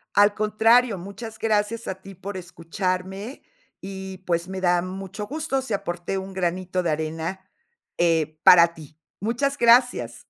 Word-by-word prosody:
Al 205 0 +5
contrario, 220 +1 +3
muchas 220 +5 -8
gracias 220 +1 0
a 190 - -2
ti 195 +1 -12
por 195 +2 -7
escucharme 185 - -4 0.4
y, 190 -1 -7
pues, 170 0 0
me 190 0 -5
da 175 -1 +2
mucho 195 +2 -6
gusto 290 -1 -2
si 230 -5 -3
aporté 175 +1 -3
un 190 0 -7
granito 185 0 -1
de 170 - 0
arena, 160 +4 -3 0.6
eh, 160 -2 +1
para 170 -2 +8
ti. 155 0 -14 0.2
Muchas 245 +7 0
gracias. 235 - +4
190 Hz, 145 wpm, -24 LUFS, 175-215 Hz, 0.6 s, para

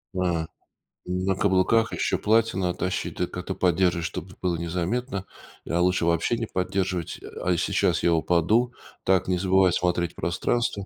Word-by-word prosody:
М. 85 -3 0 0.6
На 90 +2 -1
каблуках 100 +3 +2
еще - - 0
платья 115 -1 +2
надо 90 -2 -1
тащить, 90 0 -2
ты - - 0
как-то - - -5
поддержишь, 90 -1 +2
чтобы 90 +3 -6
было 90 -2 0
незаметно. 90 +6 -2 0.4
А 85 +2 +1
лучше 90 -1 +2
вообще 85 +8 +1
не 115 - -2
поддерживать. 95 -3 -2
А - - -5
а 90 - +3
сейчас - - +1
я 85 - +4
упаду. 90 +9 +2 0.3
Так, 95 -1 +2
не 90 -1 +1
забывай 95 0 +3
смотреть 90 -1 0
в - - -38
пространство. 100 +3 -1
90 Hz, 160 wpm, -25 LUFS, 85-95 Hz, 0.6 s, я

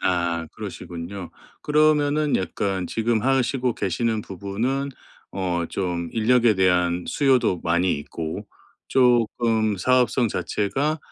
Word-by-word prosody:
아 85 -2 0
그러시군요. 85 +2 -7 0.3
그러면은 150 -1 +3
약간 95 -1 -2
지금 115 -1 0
하시고 130 -1 +1
계시는 110 +4 -1
부분은 110 +10 -3 0.4
어 90 -3 -1
좀 85 -3 -2
인력에 115 0 +3
대한 90 -2 +2
수요도 130 - +2
많이 85 +2 +2
있고 80 +2 -6 0.4
쪼끔 115 -3 +2
사업성 125 +2 +2
자체가 135 +11 -1
110 Hz, 245 characters per minute, -23 LUFS, 90-125 Hz, 0.4 s, 그러면은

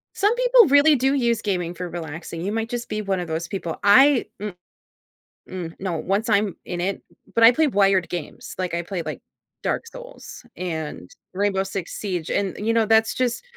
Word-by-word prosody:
Some 415 +3 +2
people - - +5
really 285 +2 +6
do 265 +2 +1
use 235 -4 +1
gaming 180 -4 -2
for 180 +1 -5
relaxing, 165 0 -7
you 200 - -2
might 225 +1 -2
just 240 -1 -4
be 215 0 -3
one 195 -2 -1
of 175 - -5
those 160 +1 -3
people. 170 -4 -4
I 255 +6 +6
mm 205 -3 -5 0.9
mm, 175 -3 -6
no, 185 -3 -3
once 200 +5 -1
I'm 205 -2 +1
in 175 -1 -4
it 195 +2 -2 0.3
but 230 - +4
I 230 - +9
play 315 +4 +2
wired 195 -4 +3
games, 175 -4 -7
like 185 -2 -2
I 170 - -1
play 175 0 -4
like, - - -6 0.4
Dark - - -2
Souls - - -11
and 160 - -5 0.2
Rainbow 195 0 +1
Six 190 -2 -5
Siege, 180 -6 -3
and 195 -2 -1
you 225 - +2
know, 230 -1 +2
that's 220 0 +3
just 255 - -1
200 Hz, 195 wpm, -23 LUFS, 175-235 Hz, 0.9 s, I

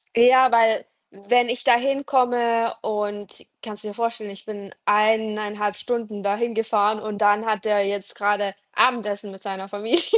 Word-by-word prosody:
Ja, 255 +2 +6
weil, 225 -1 +3 0.3
wenn 235 +5 +1
ich 245 0 -3
da - - +6
hinkomme 245 -3 +1
und 205 -2 -5 0.2
kannst 215 -1 -9
du - - -6
dir 205 - -8
vorstellen, 230 -2 -3
ich 195 - -13
bin 205 -2 -9
1,5 210 -1 +1
Stunden 220 -4 -4
da 200 0 +1
hingefahren 220 -2 0
und 215 -1 -6
dann 205 +1 +3
hat 215 -1 -1
der 205 -2 +2
jetzt 200 0 -5
gerade 205 -1 0 0.2
Abendessen 210 -5 +1
mit 195 0 -14
seiner 195 -1 -6
Familie. 220 +12 0
215 Hz, 160 wpm, -23 LUFS, 205-235 Hz, 0.3 s, Ja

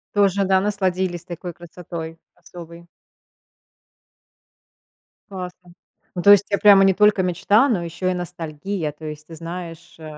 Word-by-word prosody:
Тоже 200 -1 +2
да, 190 0 +3
насладились 190 -4 -2
такой 175 0 -7
красотой 165 -1 -9 0.2
особой. 170 -1 -13 2.4
Классно, 180 -2 -9 0.4
ну 175 - -2
то 200 - +7
есть, 205 0 +6
у - - -49
тебя 200 - -1
прямо 200 -2 +7
не 195 - +4
только 210 0 +3
мечта, 200 - +2
но 195 -8 0
ещё 175 +2 -3
и - - 0
ностальгия. 170 0 -5
То 155 +2 -12
есть, 150 0 -8
ты 165 - -10
знаешь, 170 0 -9
э, - - -12
180 Hz, 145 wpm, -21 LUFS, 170-195 Hz, 2.4 s, то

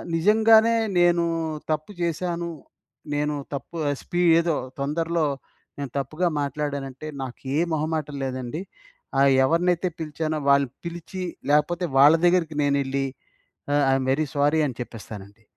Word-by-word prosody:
నిజంగానే 220 +5 +5 0.2
నేను 175 -1 +4 0.5
తప్పు 155 +5 -2
చేశాను, 170 0 -2 0.6
నేను 150 0 0 0.2
తప్పు 140 +4 -6
ఆహ్, 145 - 0
స్పీ 175 - -2 0.2
ఏదో 170 -2 +1 0.2
తొందర్లో 165 +3 0 0.5
నేను 140 -2 -4
తప్పుగా 155 +7 -1
మాట్లాడానంటే‌, 140 0 -4
నాకు 130 -2 -6 0.2
ఏ - - +3
మొహమాటం 155 -1 -2
లేదండి. 130 +4 -4 0.6
ఆహ్, 140 0 +5
ఎవరినైతే 175 +3 +1
పిలిచానో 155 0 -3
వాళ్ళు 140 -1 +4 0.2
పిలిచి, 175 +2 -6 0.3
లేపోతే 170 +4 +2
వాళ్ళ 145 +3 +8
దగ్గరికి 175 -4 +2
నేనెళ్ళి, 140 -1 0 0.7
ఆహ్, 145 0 +3
ఐ - - +4
యమ్ 130 -1 -2
వెరీ 155 +2 0
స్వోరీ 145 +2 +2
అని 130 - -6
చెప్పేస్తానండి. 105 -2 -9
155 Hz, 125 wpm, -24 LUFS, 140-170 Hz, 0.7 s, వాళ్ళ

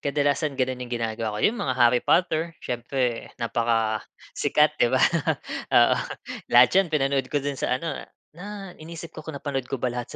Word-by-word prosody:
kadalasan 145 0 0
gano'n 130 -1 -1
yung 125 - -6
ginagawa 110 -2 -3
ko. - - -4
Yung 235 +3 +2
mga 130 -2 -1
Harry 120 0 +5
Potter, 165 -2 +1
siyempre 120 0 -2
napakasikat, 115 -2 0
'di - - +5
ba? - - +2 0.8
Oo, - - +6 0.5
lahat 120 0 +7
'yon 190 -1 +4
pinanood 135 -4 0
ko - - -2
do'n 140 -1 -2
sa 125 - +1
ano, 160 0 -4 0.3
na 195 +2 -8
inisip 165 0 -9
ko - - -8
kung 160 -3 -7
napanood 135 -3 -4
ko 135 - -2
ba 125 0 -2
lahat 120 -1 -4
135 Hz, 170 wpm, -25 LUFS, 120-155 Hz, 0.8 s, lahat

